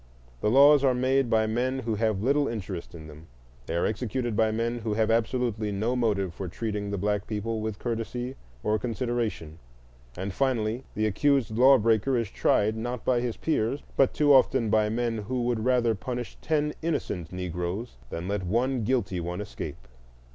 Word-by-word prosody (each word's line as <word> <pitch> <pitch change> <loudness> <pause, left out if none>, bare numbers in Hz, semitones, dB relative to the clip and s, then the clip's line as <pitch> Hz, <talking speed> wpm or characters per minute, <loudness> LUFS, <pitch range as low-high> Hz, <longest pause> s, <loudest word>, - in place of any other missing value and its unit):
The 105 - +1
laws 140 +4 +7
are 130 -2 +4
made 130 0 +2
by 110 -1 +3
men 125 +4 0
who 115 -2 -2
have 110 -2 0
little 140 +3 +2
interest 95 -7 -5
in 80 -2 -10
him; 75 +2 -13 0.4
they 80 - -2
are 85 - +1
executed 120 +2 -2
by 110 0 +3
men 115 +2 -1
who 110 -2 -2
have 110 0 +2
absolutely 115 -2 0
no 110 +5 -1
motive 100 -7 0
for 95 +2 -5
treating 105 +2 -3
the 100 - -2
black 105 +1 -1
people 110 +1 -3
with 110 -1 -3
courtesy 120 +2 -3 0.3
or 105 0 +1
consideration; 115 -9 -3 0.6
and, 95 +1 -4
finally, 120 -1 0
the 110 - +1
accused 120 +2 +1
law 130 +3 +7
breaker 115 +3 +2
is 115 -4 -2
tried, 110 +1 +2
not 120 +2 -4
by 125 -2 +2
his 120 -2 -3
peers, 140 -3 -1
but 135 - +4
too 145 -1 +4
often 130 -4 +4
by 110 -1 +3
men 115 0 -1
who 120 +4 -2
would 120 -2 0
rather 125 -3 +3
punish 120 +3 -5
ten 150 -1 0
innocent 125 - -2
Negroes 90 - -4
than 85 +2 -5
let 100 -1 -2
one 120 +6 0
guilty 105 -6 0
one 85 +2 -4
escape. 100 -11 -7
115 Hz, 180 wpm, -27 LUFS, 105-125 Hz, 0.6 s, laws